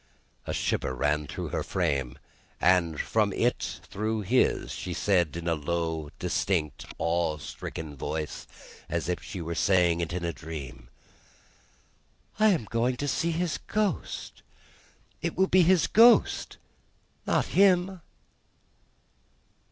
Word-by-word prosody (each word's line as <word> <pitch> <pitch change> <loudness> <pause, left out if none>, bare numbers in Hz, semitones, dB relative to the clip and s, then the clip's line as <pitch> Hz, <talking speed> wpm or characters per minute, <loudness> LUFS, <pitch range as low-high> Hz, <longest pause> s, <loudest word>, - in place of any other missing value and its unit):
A - - -2
shiver 65 - -1
ran 75 +3 0
through - - -5
her - - -2
frame, 70 -8 -1 0.4
and 85 -4 +3
from - - +1
it - - -1
through 110 +2 -2
his. 120 +6 +1
She 90 -2 -5
said, 85 -6 +1
in 85 0 -5
a 85 - +3
low, 80 0 -2
distinct, 90 -5 -1
awe 85 -2 0
stricken 75 +1 -7
voice, 75 +2 -4 0.4
as 85 -2 -2
if 90 0 -2
she 90 +1 -7
were 85 +1 -3
saying 85 -1 +3
it 85 - -3
in 85 0 -3
a 85 - -2
dream, 65 -8 -8 1.5
"I 215 - +6
am 175 - +2
going 120 +3 0
to 145 - -2
see 165 +4 0
his 170 0 -1
Ghost! 210 -1 -3 0.8
It - - -3
will 190 - +5
be 185 -1 +4
his 180 0 +4
Ghost 235 +2 +5 0.7
not - - +2
him!" 185 -1 +4
85 Hz, 130 wpm, -28 LUFS, 80-125 Hz, 1.5 s, I